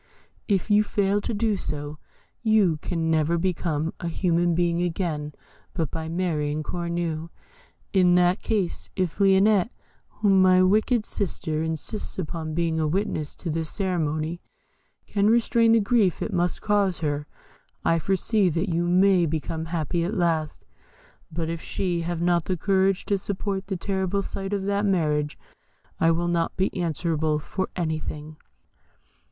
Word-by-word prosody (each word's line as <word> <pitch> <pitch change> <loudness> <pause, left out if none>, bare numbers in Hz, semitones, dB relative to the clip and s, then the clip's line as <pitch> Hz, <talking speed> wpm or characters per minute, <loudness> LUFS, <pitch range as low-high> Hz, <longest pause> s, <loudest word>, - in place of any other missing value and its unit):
If 200 +1 0
you 210 +1 +6
fail 205 -1 +1
to - - -3
do 220 -1 +1
so, 145 -2 -5 0.4
you 215 -8 +3
can 165 +1 -2
never 160 +1 +2
become 165 -3 -1
a 170 - -4
human 170 0 +1
being 170 0 +1
again 165 -4 -2 0.4
but 160 -5 -1
by 160 0 -4
marrying 155 -4 -1
Cornue. 170 -1 -3 0.6
In 180 -2 +5
that 180 +2 +3
case, 205 -6 -1
if 185 -1 -2
Lionette, 195 +1 +4 0.4
whom 195 -3 +3
my 185 0 +6
wicked 215 +4 +2
sister 160 -5 -2
insists 160 +6 -4
upon 160 -3 -4
being 165 -1 0
a 155 - +1
witness 155 -3 -2
to 170 - -5
this 160 0 -2
ceremony, 165 -3 -2 0.6
can 205 0 +1
restrain 230 0 +4
the 230 - +6
grief 205 -3 +2
it - - -4
must 175 0 0
cause 200 -3 +2
her, 150 -1 -2 0.6
I 165 - +3
foresee 195 +3 +1
that 170 +3 -1
you 170 +1 +1
may 180 -1 +4
become 160 +1 -3
happy 165 0 -1
at 190 +6 -2
last; 165 -4 0 0.7
but 165 0 -3
if 165 0 -4
she 175 -3 -2
have 170 0 -2
not 175 -1 +2
the 185 - -1
courage 190 +1 +2
to 200 -1 0
support 195 0 -3
the 195 -2 -2
terrible 190 +1 -1
sight 195 0 -5
of 200 -2 -1
that 200 +1 0
marriage, 150 -7 +1 0.6
I 165 - +4
will 170 +1 +1
not 170 -1 0
be 190 +1 0
answerable 160 -3 0
for 190 +5 -3
anything." 155 -2 -4
175 Hz, 150 wpm, -25 LUFS, 160-195 Hz, 0.7 s, you